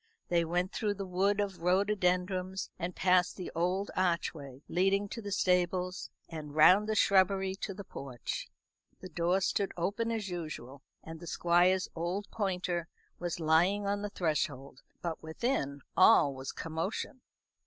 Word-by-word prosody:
They 170 -1 +3
went 175 +3 -1
through 210 -2 -1
the 195 0 -5
wood 195 +3 +1
of 200 -3 -2
rhododendrons, 185 0 +1
and 180 0 -3
past 180 -1 +3
the 185 - -6
old 180 +4 0
archway 160 -7 -1
leading 195 +3 +2
to 230 - -6
the 205 -1 -6
stables, 180 -1 +1 0.2
and 150 -3 -8
round 185 +7 +7
by 220 - 0
the - - -2
shrubbery 190 -1 +3
to 195 -1 -5
the 200 - -7
porch. 135 - -6 0.5
The 185 - -8
door 175 +3 +1
stood 195 +1 0
open 200 +7 -1
as 220 -3 -2
usual, 155 -7 -6 0.2
and 160 0 -9
the 170 - -10
Squire's 175 +3 +3
old 175 +5 -2
pointer 180 -5 -1 0.3
was 175 -1 -3
lying 170 +6 +3
on 200 0 0
the 205 - -3
threshold; 145 -7 -2 0.2
but 170 -2 -3
within 160 - -2
all 140 - +6
was 130 0 -6
commotion. 165 +10 -4
180 Hz, 155 wpm, -31 LUFS, 165-195 Hz, 0.5 s, round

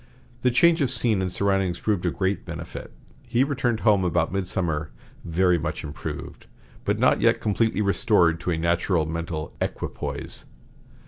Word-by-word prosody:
The 125 - +3
change 160 +7 +4
of 135 - +2
scene 115 -5 +1
and 90 -1 -1
surroundings 95 -3 +1
proved 100 -5 0
of - - -2
great 95 +1 0
benefit. 85 -2 -7 0.4
He 120 +2 +3
returned 130 -5 0
home 105 -4 +4
about 85 -1 +1
midsummer 85 -5 -1 0.3
very 90 +1 +2
much 80 0 -3
improved, 75 -3 -7 0.4
but - - +1
not - - +3
yet - - +4
completely 110 +1 +1
restored 100 -5 +3
to 85 - -3
a 85 - +1
natural 85 0 +1
mental 80 -1 -4
equipoise. - - -4
95 Hz, 150 wpm, -25 LUFS, 85-110 Hz, 0.4 s, change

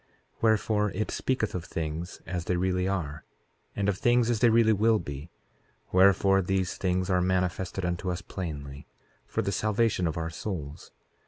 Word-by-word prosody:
Wherefore, 110 -1 +2
it 110 +3 -2
speaketh 130 -5 -1
of 90 - -3
things 80 +1 -5
as 90 -2 -4
they 90 - 0
really 90 0 0
are, 80 -6 -3 0.5
and 100 -1 -1
of 100 -1 0
things 120 0 +3
as 115 - 0
they 120 - +5
really 110 -1 +5
will 110 +2 +3
be; 70 -3 -7 0.6
wherefore, 95 +1 +5
these 95 -1 -1
things 90 -1 0
are 90 -1 +3
manifested 90 0 -1
unto 90 +1 -2
us 90 -1 -3
plainly, 70 -6 -6 0.4
for - - -1
the 100 - -1
salvation 105 -3 +1
of 80 - -3
our 80 0 -3
souls. 80 -5 -6
95 Hz, 165 wpm, -28 LUFS, 85-105 Hz, 0.6 s, they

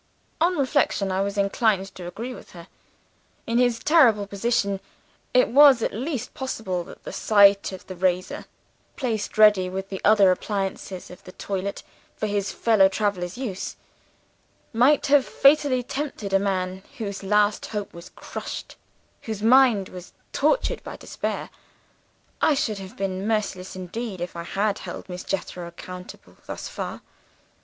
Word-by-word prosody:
"On 350 +1 +3
reflection, 235 -7 +1
I 190 +1 0
was 200 +1 -2
inclined 200 -1 +1
to 180 -1 -8
agree 235 +8 -6
with - - -13
her. 170 -2 -11 0.8
In 230 +1 +1
his 245 -2 +3
terrible 240 -9 +4
position, 200 -1 0 0.5
it 250 - +4
was 275 -2 +7
at - - -1
least 260 +2 -4
possible 220 -9 -3
that - - -13
the - - -7
sight 200 -2 +5
of 190 - -9
the 185 - -8
razor 180 0 -1 0.5
(placed 225 -8 -3
ready, 210 -4 +6
with 190 +1 -5
the 190 - -5
other 205 -3 +6
appliances 195 -1 -3
of 180 - -13
the 185 - -11
toilet, 200 0 -4 0.3
for - - -3
his 205 -1 -1
fellow 215 -4 +4
traveler's 195 -2 -2
use) 220 -8 -4 1.0
might 265 +6 +4
have 285 -1 +5
fatally 275 -3 +3
tempted 255 -7 -4
a 195 - +5
man 190 -1 -2 0.2
whose 200 -4 -4
last 210 +1 +2
hope 210 -2 -5
was 170 0 -11
crushed, - - -7 0.4
whose 215 -2 -5
mind 235 -5 +5
was 180 -1 -11 0.2
tortured - - +1
by - - -8
despair. - - -4 0.9
I 305 - +4
should 225 -8 -1
have 190 -1 -10
been 195 0 -2
merciless 205 -5 -2
indeed, 190 +2 -5
if 175 0 -5
I 170 0 -5
had 200 +3 -1
held - - -8
Miss 180 -1 -6
Jethro 180 -2 -4
accountable 180 +1 -11
thus - - -5
far. - - -6
200 Hz, 150 wpm, -24 LUFS, 190-235 Hz, 1.0 s, was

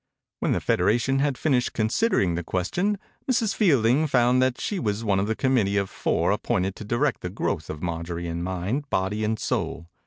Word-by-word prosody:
When - - +1
the - - +1
federation 120 +8 +2
had 140 -2 +1
finished 130 -6 +1
considering 110 - +1
the 85 +1 -2
ques 90 +2 -2
tion, 205 +3 +1 0.3
Mrs. 225 -4 +1
Fielding 140 - +3
found 125 -1 +3
that 130 -1 +1
she 205 - -2
was 105 -3 -1
one 100 -3 +2
of 100 +2 -1
a 110 - +1
committee 115 -7 +1
of 100 -1 -1
four - - 0
appointed 95 +1 0
to - - -7
direct 120 +6 0
the 90 - -4
growth 90 - -3
of 75 +2 -6
Marjorie 85 0 -3
in 85 0 -3
mind, 95 +11 -3
body, 105 +3 -1
and 110 +1 0
soul. 85 -5 -3
110 Hz, 195 wpm, -25 LUFS, 95-135 Hz, 0.3 s, Fielding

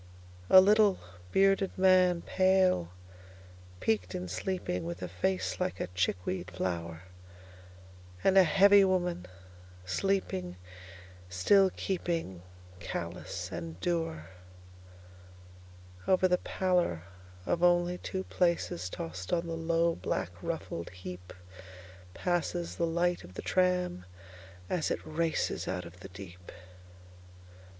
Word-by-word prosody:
A 190 - +10
little, 205 0 +4 0.3
bearded 195 0 +2
man, 185 -2 +4
pale, 185 - +2 0.9
peaked 95 -5 0
in 90 0 -4
sleeping, 180 - -3
With 85 +2 -5
a - - -2
face 185 - -2
like 185 0 -2
a - - -1
chickweed 90 0 -1
flower. 85 -2 -4 1.2
And 190 - +4
a 195 - +9
heavy 200 +3 +6
woman, 180 - 0 0.6
sleeping 95 - -1 0.7
still 190 - +4
keepingCallous 90 - -5
and 85 0 -6
dour. 165 - -2 1.8
Over 185 0 +4
the 180 0 +2
pallor 180 - 0 0.4
of 170 - 0
only 175 0 +3
two 190 0 -4
placesTossed 90 - -2
on 170 0 +1
the 165 - -4
low, 165 +1 +1
black, 90 - -3
ruffled 125 - -4
heapPasses 90 - -6
the 170 - +1
light 175 +1 0
of 90 +1 -13
the - - -6
tram 180 - +1 0.6
as 175 -4 -1
it - - -1
racesOut 155 - -2
of 85 +1 -12
the 95 - -10
deep. 90 -1 -11
165 Hz, 105 wpm, -30 LUFS, -, 1.8 s, A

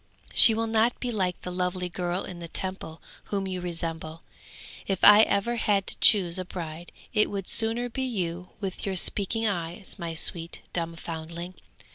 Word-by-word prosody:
She 225 - +10
will 225 +1 -1
not 225 +2 +1
be 245 - -3
like 185 -5 -2
the 180 - -5
lovely 180 0 -3
girl 175 +1 -3
in 180 -2 -9
the 170 - -8
Temple 185 -2 -5 0.2
whom 195 -1 -3
you 185 -1 -4
resemble. 165 -2 -4 0.6
If 195 -2 -3
ever 210 +1 +6
I - - -2
had 200 -3 0
to - - -3
choose 185 -4 +5
a - - -3
bride 170 -1 -8 0.2
it 210 - +2
would 195 -2 -5
sooner 230 +2 +1
be 245 +2 -5
you 180 -8 -4
with 195 -3 -5
your 195 -1 -2
speaking 210 +4 +1
eyes, 180 0 -4
my 170 -2 -5
sweet, 165 0 -3
dumb 170 -1 -3
foundling!' 165 +2 -7
185 Hz, 175 wpm, -26 LUFS, 170-210 Hz, 0.6 s, She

